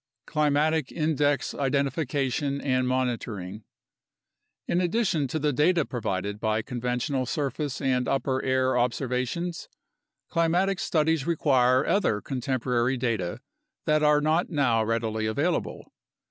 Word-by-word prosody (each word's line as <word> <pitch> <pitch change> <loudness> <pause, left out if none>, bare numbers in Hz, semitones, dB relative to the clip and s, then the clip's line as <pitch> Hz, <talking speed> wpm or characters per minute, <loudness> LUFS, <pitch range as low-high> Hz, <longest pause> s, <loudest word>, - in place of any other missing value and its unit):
Climatic 150 0 +1
Index 150 -3 0
Identification 140 0 -1
and 130 -2 0
Monitoring 115 -6 -3 1.0
In 175 - +1
addition 180 -5 +1
to 145 - -3
the 150 -1 0
data 160 +3 +3
provided 105 -3 -3
by 110 0 0
conventional 125 +2 -2
surface 145 0 -2
and 130 -3 0
upper 130 0 0
air 130 0 +1
observations, 125 +7 -1 0.6
climatic 175 +3 +1
studies 160 -2 +1
require 130 -5 +3
other 200 - +1
contemporary 125 0 -1
data 110 -4 -2 0.4
that 155 -1 +2
are 150 -1 +4
not 155 +4 +1
now 125 -8 +2
readily 110 -1 -1
available. 145 +11 -2
135 Hz, 110 wpm, -26 LUFS, 125-155 Hz, 1.0 s, are